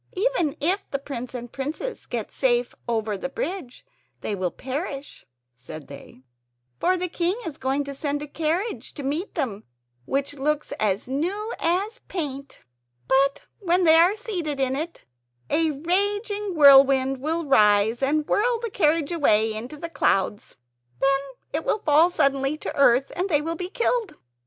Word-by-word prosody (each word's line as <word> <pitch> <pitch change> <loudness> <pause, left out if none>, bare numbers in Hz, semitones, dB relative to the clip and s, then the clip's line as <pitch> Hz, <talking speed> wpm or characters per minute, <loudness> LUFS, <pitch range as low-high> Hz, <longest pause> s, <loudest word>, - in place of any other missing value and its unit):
"Even 370 - 0
if 360 +7 +1
the 275 - -1
prince 255 -3 -7
and 240 -1 -7
princess 310 - -5
get 230 -3 -4
safe 245 -2 +1 0.2
over 220 -2 0
the 235 +7 -4
bridge 290 -3 -5 0.4
they - - -2
will 185 -2 -1
perish," 275 - -6 0.3
said 145 +5 -10
they; 140 -2 -12 0.6
"for 370 0 +2
the 365 0 -1
king 345 +2 0
is 320 -4 -6
going 270 +2 0
to 280 0 -6
send 290 +1 -2
a - - -7
carriage 330 +9 -2
to 285 - -6
meet 300 +8 -2
them 230 - -2 0.4
which 275 - -1
looks 295 +2 -1
as 205 0 0
new 365 - -2
as 390 +8 0
paint. 280 -6 -5 0.5
But 275 +1 +2 0.2
when 365 -2 +2
they 320 -2 +6
are 350 +5 +5
seated 360 - -4
in 265 -1 +1
it 320 +4 -5 0.5
a 325 0 +3
raging 405 +6 -1
wind 270 -2 +6
will 320 +4 -2
rise 210 -2 +4
and 295 +3 +1
whirl 465 +6 +1
the 460 -2 -4
carriage 315 -4 +2
away 220 -10 +3
into 240 +7 -6
the 335 - -5
clouds. 205 - 0 0.4
Then 275 0 +3 0.3
it 310 +2 -1
will - - +1
fall 310 +3 +5
suddenly 275 -3 +1
to - - -6
earth, 270 -1 +4
and 370 +3 -1
they 295 -3 +2
will 330 +1 -2
be 360 +2 -5
killed. 465 0 -1
290 Hz, 160 wpm, -24 LUFS, 265-350 Hz, 0.6 s, they